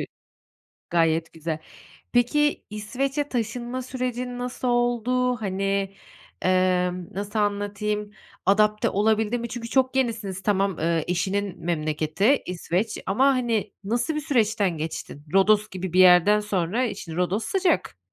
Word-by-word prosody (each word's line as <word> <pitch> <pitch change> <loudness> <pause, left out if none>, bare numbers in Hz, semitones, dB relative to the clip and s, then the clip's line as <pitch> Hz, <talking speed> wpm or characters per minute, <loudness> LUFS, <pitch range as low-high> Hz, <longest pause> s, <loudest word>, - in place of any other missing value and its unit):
ü - - -2 0.9
gayet 165 -1 +2
güzel. 160 -1 -4 0.5
Peki, 295 +5 +2
İsveç'e 270 +7 -2
taşınma 240 +1 -3
sürecin 250 -1 -4
nasıl 250 +1 -3
oldu? 245 +1 +1
Hani, 195 -1 -1 0.5
emm, 180 -1 +1
nasıl 205 +3 -3
anlatayım, 205 0 -1 0.4
adapte 210 +2 +3
olabildin 220 +3 +1
mi? 235 - -4
Çünkü 230 0 -6
çok 260 +1 +2
yenisiniz 220 -7 -1
tamam, 195 -3 +1
eee, 165 -1 +1
eşinin 190 0 -2
memleketi 155 - +1
İsveç. 180 +4 -2
Ama, 230 +8 +3
hani, 240 -5 +1
nasıl 235 +8 0
bir 305 - -1
süreçten 220 - +1
geçtin? 150 -2 -6
Rodos 210 +2 +4
gibi 185 -2 -5
bir 185 - +4
yerden 185 +3 +7
sonra, 210 +3 0
eee, 235 - -2
şimdi 170 -4 -7
Rodos 185 +5 0
sıcak. 380 - 0
210 Hz, 130 wpm, -25 LUFS, 185-245 Hz, 0.9 s, yerden